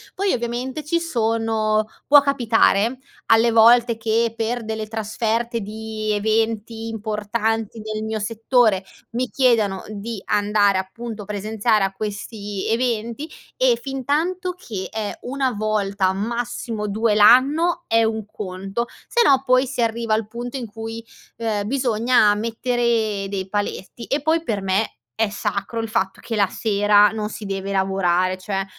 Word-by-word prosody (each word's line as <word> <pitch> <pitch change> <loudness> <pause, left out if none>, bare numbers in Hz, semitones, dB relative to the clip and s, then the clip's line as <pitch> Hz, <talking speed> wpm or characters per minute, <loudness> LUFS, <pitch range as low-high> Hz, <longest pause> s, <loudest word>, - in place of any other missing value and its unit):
Poi, 395 0 +1
ovviamente, 250 +4 -3
ci 335 +3 +1
sono 225 -7 0 0.2
può 290 0 +8
capitare 240 -4 +2 0.3
alle 225 +1 +5
volte 230 +1 +5
che, 225 +1 +1
per 230 +1 -2
delle 220 0 -4
trasferte 225 +2 -2
di 215 +1 -4
eventi 220 +1 -1
importanti 220 0 -2
nel 215 0 -4
mio 220 0 -2
settore, 220 -1 +2 0.3
mi 250 +2 -2
chiedano 220 -8 +2
di 215 +1 -5
andare, 205 -1 +2
appunto, 215 +3 -6
presenziare 210 +1 0
a 195 - 0
questi 205 0 -5
eventi 235 +4 -1 0.3
e - - +3
fintanto 310 +8 -1
che 215 - -6
è 215 -2 -3
1 265 +1 -1
volta, 205 -3 0
massimo 225 +1 -3
2 215 +2 +1
l'anno 275 +11 +5
è 225 0 +3
un 220 -1 -1
conto, 195 +3 -4 0.2
se 480 - +2
no 270 -1 +4
poi 255 +1 +4
si 255 -1 -3
arriva 230 -1 0
al 215 -1 -2
punto 240 +4 -6
in 250 - -4
cui, 225 +1 -7 0.3
ehm, 215 -3 -2
bisogna 240 -3 +3
mettere 230 -2 0
dei 195 -1 -3
paletti. 205 +2 -4
E 280 +5 -1
poi 320 +2 +2
per 215 -8 -2
me 195 +3 0 0.3
è 225 - +3
sacro 210 +2 -3
il 225 - -5
fatto 205 -4 -1
che 230 - -4
la 200 -2 +4
sera 205 0 +3
non 215 -1 -3
si 215 - -8
deve 195 0 -3
lavorare 185 -1 +1
cioè, 195 0 -3
220 Hz, 145 wpm, -22 LUFS, 210-235 Hz, 0.3 s, può